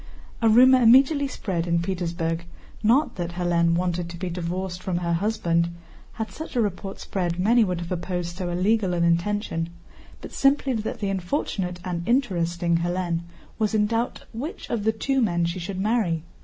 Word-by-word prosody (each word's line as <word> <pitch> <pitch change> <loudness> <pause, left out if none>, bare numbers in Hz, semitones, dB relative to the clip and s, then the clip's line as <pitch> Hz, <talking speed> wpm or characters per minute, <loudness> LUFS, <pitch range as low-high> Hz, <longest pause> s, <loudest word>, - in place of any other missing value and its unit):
A 225 - +4
rumor 255 +3 +7
immediately 270 +5 +5
spread 180 -9 -3
in 170 0 +2
Petersburg, 170 -2 -2 0.4
not 240 +6 +3
that 175 -1 -3
Hélène 170 -1 +2
wanted 175 -1 -1
to 170 - -8
be 180 0 -4
divorced 180 +1 -4
from 185 -2 -2
her 170 -1 -1
husband 170 -3 +1 0.4
(had 220 0 -4
such 315 -3 -8
a - - +2
report 195 -2 -2
spread 175 -3 -2
many 225 +6 +4
would 180 -4 -1
have 170 - -7
opposed 175 -1 -3
so 180 -1 -3
illegal 185 +1 +1
an 170 - +1
intention) 170 0 0 0.5
but - - -9
simply 275 -1 +2
that 220 -1 -3
the 200 - 0
unfortunate 185 - -2
and 175 -2 -2
interesting 175 -9 +1
Hélène 175 0 -1 0.4
was 220 0 +1
in 210 -1 +3
doubt 230 +3 -2
which 295 - -6
of 220 -3 -1
the 220 - +4
two 270 +4 0
men 175 -6 +1
she 170 +2 -3
should 185 +2 -5
marry. 195 -6 +1
185 Hz, 175 wpm, -25 LUFS, 170-220 Hz, 0.5 s, rumor